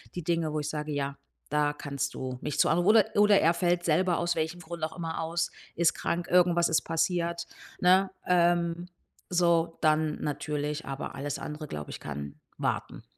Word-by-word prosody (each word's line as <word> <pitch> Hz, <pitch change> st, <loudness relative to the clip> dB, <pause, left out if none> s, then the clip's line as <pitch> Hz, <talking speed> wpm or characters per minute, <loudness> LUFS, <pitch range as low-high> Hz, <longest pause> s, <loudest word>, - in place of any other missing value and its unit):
die 175 Hz, -, -4 dB
Dinge, 165 Hz, -1 st, 0 dB
wo 155 Hz, -, 0 dB
ich 150 Hz, 0 st, -3 dB
sage: 150 Hz, 0 st, -4 dB
„Ja, 140 Hz, -1 st, -2 dB, 0.3 s
da 150 Hz, 0 st, +1 dB
kannst 140 Hz, -1 st, -4 dB
du 130 Hz, -1 st, -5 dB
mich 150 Hz, -2 st, -3 dB
zu -, -, +5 dB
anru“ 175 Hz, +3 st, +3 dB
oder 215 Hz, -1 st, +7 dB
oder 205 Hz, -1 st, +6 dB
er 165 Hz, +2 st, +4 dB
fällt 175 Hz, 0 st, +1 dB
selber 175 Hz, +2 st, +2 dB
aus 175 Hz, 0 st, 0 dB
welchem 160 Hz, +2 st, -2 dB
Grund 170 Hz, 0 st, -7 dB
auch 160 Hz, +2 st, -3 dB
immer 165 Hz, -1 st, -3 dB
aus, 165 Hz, +1 st, -1 dB, 0.2 s
ist 170 Hz, 0 st, +3 dB
krank, 175 Hz, +1 st, -2 dB
irgendwas 175 Hz, -1 st, +4 dB
ist 160 Hz, -, +3 dB
passiert, 170 Hz, +1 st, -1 dB, 0.3 s
ne? 190 Hz, +1 st, +4 dB, 0.2 s
Ähm, 175 Hz, -1 st, +2 dB, 0.4 s
so 170 Hz, -2 st, +2 dB
dann 155 Hz, -1 st, +2 dB
natürlich, 150 Hz, +1 st, -3 dB
aber 135 Hz, 0 st, -5 dB
alles 140 Hz, +1 st, -4 dB
andere, 150 Hz, +1 st, -6 dB
glaube 75 Hz, -, -6 dB
ich, -, -, -7 dB
kann 70 Hz, -1 st, -6 dB, 0.2 s
warten. -, -, -3 dB
165 Hz, 180 wpm, -28 LUFS, 150-175 Hz, 0.4 s, oder